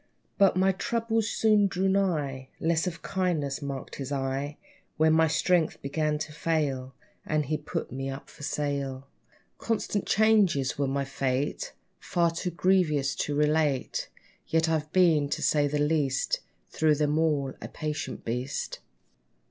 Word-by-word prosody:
But 195 Hz, -2 st, +5 dB
my 190 Hz, +1 st, +4 dB
troubles 225 Hz, +2 st, -1 dB
soon 215 Hz, -2 st, +4 dB
drew 190 Hz, 0 st, 0 dB
nigh: 155 Hz, -9 st, 0 dB
Less 165 Hz, +2 st, +1 dB
of 165 Hz, -2 st, -5 dB
kindness 165 Hz, -7 st, -1 dB
marked 140 Hz, -2 st, -5 dB
his 140 Hz, 0 st, -5 dB
eye, 140 Hz, +1 st, -2 dB, 0.4 s
When 160 Hz, 0 st, +4 dB
my 160 Hz, 0 st, +5 dB
strength 160 Hz, +1 st, +2 dB
began 150 Hz, +2 st, 0 dB
to 150 Hz, 0 st, -5 dB
fail; 145 Hz, -5 st, -1 dB, 0.3 s
And 155 Hz, -1 st, 0 dB
he 155 Hz, +3 st, -1 dB
put 155 Hz, +2 st, -4 dB
me 135 Hz, +1 st, -4 dB
off 135 Hz, +1 st, -8 dB
at 150 Hz, -, -4 dB
sale. 140 Hz, -3 st, -2 dB, 0.5 s
Constant 215 Hz, -3 st, -1 dB
changes 205 Hz, -11 st, +3 dB
were 140 Hz, -1 st, 0 dB
my 140 Hz, +1 st, -1 dB
fate, 140 Hz, -, -2 dB, 0.3 s
Far 170 Hz, -2 st, +1 dB
too 170 Hz, +2 st, -3 dB
grievous 170 Hz, -6 st, +2 dB
to 145 Hz, -, -1 dB
relate. 150 Hz, -2 st, +1 dB, 0.4 s
Yet 165 Hz, 0 st, +2 dB
I've 155 Hz, -1 st, -1 dB
been, 165 Hz, -6 st, +4 dB
to 155 Hz, +2 st, -2 dB
say 145 Hz, -1 st, +3 dB
the 150 Hz, +1 st, -1 dB
least, 145 Hz, -3 st, +1 dB, 0.3 s
Through 155 Hz, -1 st, +3 dB
them 150 Hz, +1 st, +1 dB
all 145 Hz, -4 st, +1 dB
a -, -, -5 dB
patient 150 Hz, -1 st, -5 dB
beast. 125 Hz, +4 st, -3 dB
150 Hz, 150 wpm, -28 LUFS, 140-170 Hz, 0.5 s, But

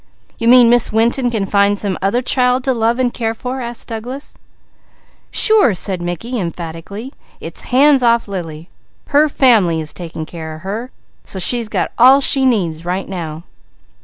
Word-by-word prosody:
"You 230 Hz, -, -1 dB
mean 245 Hz, 0 st, +7 dB
Miss 240 Hz, -1 st, +2 dB
Winton 235 Hz, +3 st, +1 dB
can 220 Hz, -4 st, -2 dB
find 200 Hz, +1 st, +1 dB
some 200 Hz, -2 st, -3 dB
other 200 Hz, +6 st, 0 dB
child 250 Hz, 0 st, +1 dB
to 265 Hz, -, 0 dB
love 230 Hz, 0 st, 0 dB
and 250 Hz, -2 st, -1 dB
care 225 Hz, -1 st, -3 dB
for?" 255 Hz, +3 st, -5 dB
asked 240 Hz, -1 st, -7 dB
Douglas. 245 Hz, +5 st, -7 dB, 1.0 s
"Sure!" 430 Hz, -, +4 dB
said 185 Hz, 0 st, -3 dB
Mickey 175 Hz, +8 st, -4 dB
emphatically. 175 Hz, -, -7 dB, 0.3 s
"It's -, -, -9 dB
hands 275 Hz, +1 st, +4 dB
off 235 Hz, -2 st, +2 dB
Lily. 165 Hz, -4 st, -7 dB, 0.4 s
Her 300 Hz, +1 st, +3 dB
family 215 Hz, -, +3 dB
is 155 Hz, -1 st, -3 dB
taking 165 Hz, -2 st, -7 dB
care 160 Hz, -1 st, -8 dB
of 155 Hz, -, -13 dB
her, 215 Hz, +7 st, -5 dB, 0.3 s
so -, -, -6 dB
she's 230 Hz, +4 st, +4 dB
got -, -, -2 dB
all 260 Hz, +3 st, +7 dB
she 270 Hz, -1 st, +3 dB
needs 170 Hz, -10 st, -1 dB
right 180 Hz, +2 st, -3 dB
now." 165 Hz, -4 st, -6 dB
225 Hz, 165 wpm, -16 LUFS, 180-250 Hz, 1.0 s, mean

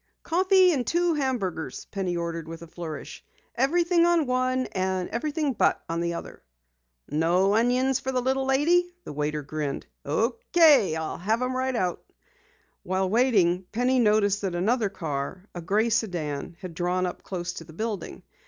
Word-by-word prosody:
"Coffee 370 Hz, +2 st, +4 dB
and 255 Hz, -5 st, -1 dB
two 345 Hz, 0 st, +2 dB
hamburgers," 245 Hz, -, -2 dB
Penny 185 Hz, -3 st, -2 dB
ordered 170 Hz, -1 st, -4 dB
with 165 Hz, 0 st, -8 dB
a -, -, -10 dB
flourish. 160 Hz, -2 st, -7 dB, 0.3 s
"Everything 340 Hz, +6 st, +2 dB
on 340 Hz, -3 st, +3 dB
one, 255 Hz, 0 st, 0 dB
and 185 Hz, -1 st, -1 dB
everything 295 Hz, +3 st, -1 dB
but, 215 Hz, -, +2 dB
on 165 Hz, 0 st, -2 dB
the 170 Hz, 0 st, -1 dB
other." -, -, -8 dB, 0.7 s
"No 175 Hz, +6 st, +2 dB
onions 250 Hz, +4 st, +2 dB
for 265 Hz, -, -3 dB
the 255 Hz, -, +1 dB
little 265 Hz, +2 st, 0 dB
lady?" 340 Hz, +7 st, +3 dB
the -, -, -7 dB
waiter 150 Hz, +1 st, -2 dB
grinned. 145 Hz, -1 st, -4 dB, 0.2 s
"Okay. 230 Hz, -, +3 dB
I'll 160 Hz, -1 st, -4 dB
have 220 Hz, +7 st, 0 dB
'em 255 Hz, 0 st, -1 dB
right 260 Hz, 0 st, -1 dB
out." 180 Hz, -6 st, -1 dB, 0.8 s
While 190 Hz, 0 st, -1 dB
waiting, 195 Hz, -7 st, +3 dB
Penny 250 Hz, +3 st, +2 dB
noticed 210 Hz, -3 st, +3 dB
that 190 Hz, -3 st, -2 dB
another 215 Hz, +4 st, +1 dB
car, 165 Hz, +1 st, -5 dB
a 175 Hz, -, -6 dB
gray 210 Hz, +7 st, +1 dB
sedan, 170 Hz, -8 st, -2 dB
had 185 Hz, -3 st, -7 dB
drawn 180 Hz, +2 st, 0 dB
up 180 Hz, -, -5 dB
close 175 Hz, -2 st, -4 dB
to 165 Hz, -, -8 dB
the 160 Hz, -, -14 dB
building. 215 Hz, +1 st, -5 dB
205 Hz, 160 wpm, -26 LUFS, 175-260 Hz, 0.8 s, Coffee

